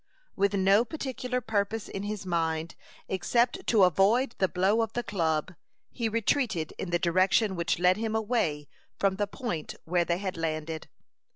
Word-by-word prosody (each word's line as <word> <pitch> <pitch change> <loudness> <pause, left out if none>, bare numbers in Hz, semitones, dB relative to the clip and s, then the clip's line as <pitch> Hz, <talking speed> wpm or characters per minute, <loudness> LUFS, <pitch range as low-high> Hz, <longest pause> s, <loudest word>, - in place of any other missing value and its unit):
With 200 0 +1
no 195 +3 +4
particular 255 -3 -3
purpose 220 -1 -1
in 195 - -5
his 205 -1 -4
mind, 165 -2 -1 0.3
except 235 +6 0
to 215 -4 +5
avoid 205 - +3
the 190 - +3
blow 190 +5 +2
of 225 - -2
the 240 - -2
club, 165 -4 -1 0.4
he 230 -3 -2
retreated 220 - 0
in 190 - -3
the 175 - +2
direction 185 +4 +2
which 170 -1 0
led 180 +2 +3
him 220 0 -2
away 205 -10 0 0.3
from 195 -1 +1
the 205 0 0
point 200 - -5
where 175 +1 +2
they 170 0 0
had 190 -2 -4
landed. 160 -1 -3
195 Hz, 165 wpm, -28 LUFS, 170-225 Hz, 0.4 s, to